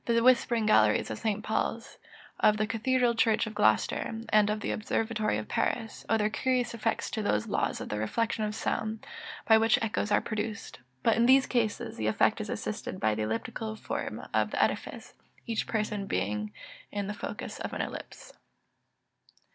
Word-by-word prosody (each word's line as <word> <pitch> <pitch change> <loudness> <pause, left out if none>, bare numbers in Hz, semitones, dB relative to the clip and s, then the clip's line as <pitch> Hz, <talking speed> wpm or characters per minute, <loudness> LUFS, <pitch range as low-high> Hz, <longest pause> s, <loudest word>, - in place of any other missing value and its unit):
The 230 -1 +3
whispering 240 -2 +4
galleries 110 - +4
of 110 - -5
St. 215 -1 -1
Paul's, 225 +1 -2 0.4
of 210 0 +4
the 215 - +1
cathedral 235 +2 +1
church 225 -1 +2
of 220 - -6
Gloucester, 205 - +2
and 210 -1 +4
of 210 0 -1
the - - -2
Observatory 220 - -1
of 110 - -5
Paris, 225 -2 -2
owe 225 - +4
their 210 -1 +2
curious 255 +1 0
effects 225 0 -1
to 220 - -2
those 105 - +1
laws - - -1
of - - -6
the 105 - -2
reflection 220 - -1
of 210 0 -2
sound, 220 0 -2 0.4
by 220 -1 +7
which 225 0 +4
echoes 215 -1 -1
are - - +5
produced; 215 -1 -4 0.2
but 225 - +4
in 235 +1 +4
these 265 +1 +6
cases 225 -4 -1
the 110 - -1
effect 110 - +2
is - - -6
assisted - - -4
by 110 0 +2
the 110 - -2
elliptical 115 - -3
form - - -4
of - - +2
the - - +2
edifice, - - -3 0.3
each 230 -2 -2
person 210 -2 -2
being 105 - -1 0.4
in 205 -1 -2
the 205 - -3
focus - - -6
of - - -4
an - - -3
ellipse. - - -7
215 Hz, 180 wpm, -29 LUFS, 205-230 Hz, 0.4 s, by